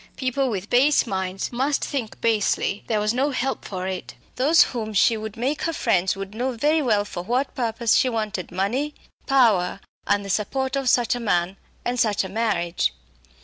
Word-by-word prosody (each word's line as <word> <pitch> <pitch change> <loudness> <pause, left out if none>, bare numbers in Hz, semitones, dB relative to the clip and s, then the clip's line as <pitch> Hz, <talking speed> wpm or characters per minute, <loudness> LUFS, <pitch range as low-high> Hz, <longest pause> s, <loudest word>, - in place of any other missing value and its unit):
People 260 0 0
with 200 -3 -3
base 275 +4 +4
minds 190 -3 -3
must 270 +4 0
think 250 -7 -4
basely; 210 -2 +1
there 220 -2 +1
was 210 +1 +1
no 270 +4 +1
help 265 -1 -2
for 185 -2 -5
it. 185 -1 -5 0.2
Those 300 +6 +5
whom 220 -3 -4
she 225 +3 +4
would 220 +1 -6
make 265 +6 -1
her 330 - -1
friends 190 - +1
would 195 +1 -7
know 250 +4 -2
very 300 +7 +2
well 215 -6 +2
for 175 - -6
what 250 +9 -1
purpose 230 -1 0
she 260 - +4
wanted 215 -5 -3
money, 240 +12 -1 0.3
power, 215 -9 +3 0.3
and 205 0 +1
the - - -7
support 265 +7 -1
of 270 -2 +1
such 240 -1 +3
a 245 - -3
man, 185 -4 0 0.3
and 245 0 -1
such 215 -4 +2
a 190 - -6
marriage. 190 - 0
225 Hz, 190 wpm, -23 LUFS, 200-260 Hz, 0.3 s, Those